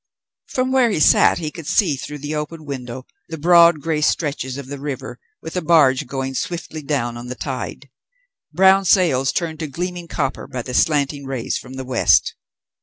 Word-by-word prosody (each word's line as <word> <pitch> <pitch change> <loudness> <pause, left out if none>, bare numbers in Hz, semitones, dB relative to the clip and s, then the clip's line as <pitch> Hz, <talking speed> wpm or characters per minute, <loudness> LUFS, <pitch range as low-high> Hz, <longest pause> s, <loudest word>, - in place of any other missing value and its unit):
From 255 0 -1
where 260 -3 +4
he 200 - -1
sat - - +5
he 155 -3 -4
could 165 -2 -10
see, 180 -4 +2
through 145 +3 -7
the 145 +2 -5
open 155 +1 -5
window, 130 -2 -6 0.2
the 160 - -5
broad 170 0 +5
grey 155 0 -1
stretches 140 -4 -1
of 140 - -7
the 140 +1 -7
river, 135 -3 -6 0.2
with 160 - -7
a 180 - 0
barge 150 -5 +3
going 135 0 -4
swiftly 160 +2 -4
down 135 -5 -2
on 120 +1 -8
the 125 - -5
tide; - - -5 0.6
brown 190 +1 +5
sails 160 -8 +3
turned 160 -3 -3
to 155 - -3
gleaming 175 +4 -5
copper 135 -4 -3
by 130 -3 -5
the 125 - -7
slanting 140 -1 +1
rays 130 -4 -3
from 125 - -11
the 130 0 -6
West. 125 -2 +3
150 Hz, 185 wpm, -20 LUFS, 130-170 Hz, 0.6 s, sat